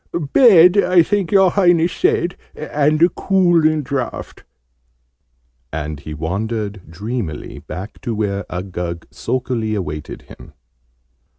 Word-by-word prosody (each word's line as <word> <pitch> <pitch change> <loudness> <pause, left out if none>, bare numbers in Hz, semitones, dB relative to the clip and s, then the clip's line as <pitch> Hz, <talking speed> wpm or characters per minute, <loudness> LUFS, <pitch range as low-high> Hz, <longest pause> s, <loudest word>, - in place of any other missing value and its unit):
"Bed, 190 -7 +7
I 180 -3 +5
think 195 -1 -1
your 195 -3 +5
Highness 175 -3 +3
said, 175 +1 0 0.2
and 150 0 0
a 175 - +6
cooling 170 -6 +2
draught?" 130 -1 -5 1.3
And 75 -1 -5
he 75 +1 -8
wandered 100 +3 -4
dreamily 95 - -5
back 80 +7 -9
to 120 -4 -3
where 100 -2 -2
Uggug 90 -2 -5
sulkily 120 -4 -2
awaited 75 -7 -6
him. 80 - -15
115 Hz, 110 wpm, -19 LUFS, -, 1.3 s, Bed